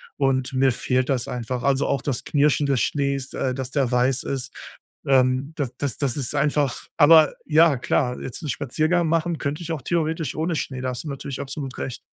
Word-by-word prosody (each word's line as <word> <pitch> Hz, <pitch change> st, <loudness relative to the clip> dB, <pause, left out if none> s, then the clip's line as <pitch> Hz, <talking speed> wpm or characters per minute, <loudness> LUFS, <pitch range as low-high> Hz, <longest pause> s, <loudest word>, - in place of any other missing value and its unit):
und 135 Hz, -2 st, 0 dB
mir 130 Hz, 0 st, +3 dB
fehlt 125 Hz, +1 st, 0 dB
das 130 Hz, -3 st, 0 dB
einfach. 125 Hz, 0 st, -4 dB
Also 140 Hz, 0 st, +2 dB
auch 135 Hz, -, 0 dB
das 135 Hz, -4 st, -2 dB
Knirschen 145 Hz, 0 st, +2 dB
des 135 Hz, -3 st, +2 dB
Schnees, 140 Hz, -1 st, -1 dB
äh, 130 Hz, -, -1 dB
dass 130 Hz, 0 st, -5 dB
der 135 Hz, -4 st, 0 dB
weiß 125 Hz, +2 st, +2 dB
ist, 135 Hz, -2 st, -4 dB, 0.5 s
ähm, 130 Hz, +1 st, +2 dB
das 135 Hz, -4 st, -2 dB
das 140 Hz, -4 st, -3 dB
das 135 Hz, -5 st, -1 dB
ist 140 Hz, 0 st, -3 dB
einfach 145 Hz, -2 st, 0 dB
aber 160 Hz, -1 st, +7 dB
ja 160 Hz, -1 st, +5 dB
klar, 125 Hz, +1 st, 0 dB
jetzt 130 Hz, -, -7 dB
'n 150 Hz, -, -4 dB
Spaziergang 155 Hz, +7 st, 0 dB
machen 165 Hz, 0 st, 0 dB
könnt 140 Hz, +1 st, -3 dB
ich 170 Hz, -1 st, -4 dB
auch 150 Hz, -, -4 dB
theoretisch 160 Hz, -3 st, -1 dB
ohne 160 Hz, +1 st, -1 dB
Schnee, 130 Hz, -3 st, -3 dB
da 130 Hz, -, -2 dB
hast 125 Hz, -1 st, -5 dB
du 155 Hz, -, -6 dB
natürlich 140 Hz, -1 st, -5 dB
absolut 140 Hz, -1 st, -6 dB
recht. 130 Hz, -, -4 dB
140 Hz, 205 wpm, -23 LUFS, 130-150 Hz, 0.5 s, aber